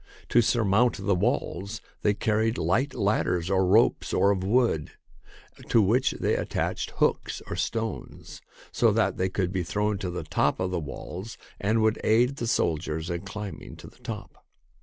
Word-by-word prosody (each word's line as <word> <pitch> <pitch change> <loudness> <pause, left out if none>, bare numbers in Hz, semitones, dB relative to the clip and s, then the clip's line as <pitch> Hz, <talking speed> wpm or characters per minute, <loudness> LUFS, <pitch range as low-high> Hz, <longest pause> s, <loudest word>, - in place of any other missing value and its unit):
To 120 - +5
surmount 115 +1 +2
the 100 +1 0
walls 100 +3 -1 0.2
they 105 -1 +2
car 110 0 0
ried 110 +1 +1
light 135 +5 0
ladders 95 -3 0
of 95 - +3
ropes 95 +5 +3
or 100 - +4
of 95 -2 -1
wood, 110 -7 +1 0.8
to 115 - +5
which 120 +7 +3
they - - +1
attached - - -2
hooks - - 0
or - - -5
stones, 115 -2 -4 0.3
so - - +3
that - - +1
they 95 +1 0
could 90 -1 -1
be 95 - 0
thrown 105 +3 -1
to 95 -3 -3
the 90 - -4
top - - 0
of 95 0 -1
the 90 - -1
walls 90 +7 -7 0.2
and 110 +2 +1
would 110 0 +1
aid 120 +5 +3
the 120 - -3
soldiers 80 -3 -1
in 85 0 -3
climbing 100 +1 -7
to - - -13
the - - -15
top. 115 -4 -8
100 Hz, 175 wpm, -27 LUFS, 95-115 Hz, 0.8 s, To